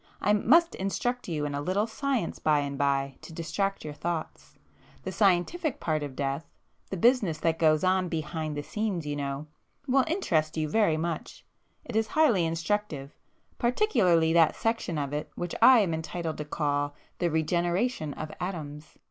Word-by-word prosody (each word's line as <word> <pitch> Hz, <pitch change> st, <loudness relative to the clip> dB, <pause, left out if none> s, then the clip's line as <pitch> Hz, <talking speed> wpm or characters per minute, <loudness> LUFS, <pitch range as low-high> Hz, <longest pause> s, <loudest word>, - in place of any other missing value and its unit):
I 210 Hz, -, +2 dB
must 325 Hz, +11 st, +4 dB
instruct 245 Hz, +6 st, -2 dB
you 155 Hz, -4 st, -2 dB
in 145 Hz, -, -3 dB
a 140 Hz, -, -2 dB
little 185 Hz, +7 st, +1 dB
science 250 Hz, -, -2 dB
by 150 Hz, -2 st, +3 dB
and 140 Hz, -1 st, -3 dB
by, 140 Hz, -1 st, 0 dB
to -, -, -11 dB
distract 195 Hz, +4 st, -2 dB
your 150 Hz, -, -5 dB
thoughts. 165 Hz, +1 st, -5 dB, 0.5 s
The -, -, -4 dB
scientific 215 Hz, -, +1 dB
part 155 Hz, -2 st, -1 dB
of 145 Hz, -3 st, -5 dB
death,—the 140 Hz, +7 st, -6 dB
business 215 Hz, -6 st, +3 dB
that 165 Hz, -1 st, +1 dB
goes 155 Hz, -2 st, +4 dB
on 185 Hz, -1 st, +2 dB
behind 155 Hz, -2 st, -3 dB
the 145 Hz, -, -3 dB
scenes 200 Hz, -3 st, -2 dB
you 145 Hz, 0 st, -2 dB
know—will 150 Hz, -, -2 dB
interest 165 Hz, -, 0 dB
you 155 Hz, -1 st, 0 dB
very 185 Hz, -2 st, +2 dB
much—it 170 Hz, +7 st, -7 dB
is 220 Hz, 0 st, +2 dB
highly 235 Hz, -, +3 dB
instructive, 165 Hz, -4 st, -2 dB, 0.4 s
particularly 185 Hz, -, +3 dB
that 165 Hz, -2 st, +5 dB
section 225 Hz, -8 st, -1 dB
of 140 Hz, -1 st, -3 dB
it 150 Hz, -, -3 dB
which 175 Hz, -1 st, -4 dB
I 255 Hz, -3 st, +8 dB
am 180 Hz, -5 st, 0 dB
entitled 160 Hz, 0 st, -4 dB
to 150 Hz, -, -3 dB
call 145 Hz, -1 st, -1 dB, 0.2 s
the 175 Hz, -, +1 dB
regeneration 170 Hz, -, 0 dB
of 155 Hz, -, -6 dB
atoms. 155 Hz, -5 st, -6 dB
165 Hz, 160 wpm, -28 LUFS, 150-210 Hz, 0.5 s, I